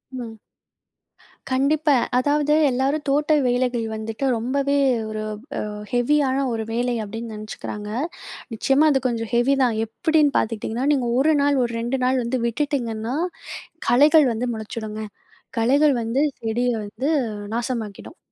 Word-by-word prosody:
ம். 235 -3 -6 1.2
கண்டிப்பா. 285 +3 +2 0.2
அதாவது 295 +3 +2 0.2
எல்லாரும் 275 +4 0
தோட்ட 295 +2 +2
வேலைகள் 245 -2 0
வந்துட்டு 220 +4 -4
ரொம்பவே 275 +4 0 0.3
ஒரு 215 0 -4 0.5
அ - - -5 0.2
ஹெவியான 265 +2 +2
ஒரு 225 -1 -2
வேலை 245 +1 0
அப்பிடின்னு 225 +2 -6
நினைச்சுக்கிறாங்க. 210 0 -7 0.7
நிச்சயமா 275 +7 +3
அது 270 - +3
கொஞ்சம் 230 -2 -3
ஹெவி 240 +4 +3
தான். 240 -3 +2
எப்பிடின்னு 295 +5 +1
பார்த்துக்கிட்டிங்கன்னா? 225 +4 -1
நீங்க 250 -4 0
1 310 +3 +4
நாள், 285 0 +3
ஒரு 240 - -2
2 245 +3 -1
நாள் 255 0 +2
வந்து 250 +2 -1
விட்டுட்டிங்கன்னா, 235 -3 -2 0.7
களைகள் 295 +4 +6
வந்து 240 +3 -2
முளைச்சிடுங்க. 220 0 -6 0.6
களைகள் 280 +5 +4
வந்து 230 +4 0 0.2
செடிய 235 +2 0 0.2
வந்து 255 +8 -3 0.5
நாசமாக்கிடும். 235 - -4
250 Hz, 125 wpm, -22 LUFS, 225-280 Hz, 1.2 s, களைகள்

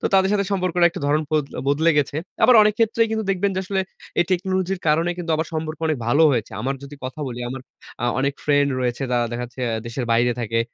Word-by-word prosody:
তো - - -8
তাদের 190 0 +4
সাথে 200 -1 +2
সম্পর্কটা 180 -2 +2
একটা - - -7
ধরণ 150 +2 +2
পোদ 155 -2 +2 0.2
বদলে 155 +4 +3
গেছে। 145 0 0 0.3
আবার 250 - +7
অনেক 210 0 +3
ক্ষেত্রেই 230 0 +3
কিন্তু 220 -1 -1
দেখবেন 195 +1 +1
যে - - +1
আসলে 190 +1 -1 0.4
এই - - +5
টেকনোলজির 185 0 0
কারণে 165 +3 +2
কিন্তু 170 -1 -4
আবার 160 0 -1
সম্পর্ক 155 -1 -3
অনেক 155 -4 0
ভালো 145 +7 +4
হয়েছে। 120 -3 -1
আমার 135 +4 -1
যদি 140 +1 -9
কথা 130 +4 -6
বলি, 120 -1 -6
আমার 130 +1 -5 0.4
আ - - +1
অনেক 140 +1 +1
ফ্রেন্ড 145 -1 +3
রয়েছে, 120 0 -1
তারা 120 -1 +2
দেখা 120 +1 -3
যাচ্ছে 125 +2 -12 0.3
দেশের 120 +2 -3
বাইরে 120 +1 +3
থাকে। 115 0 0
155 Hz, 225 wpm, -22 LUFS, 130-185 Hz, 0.4 s, আবার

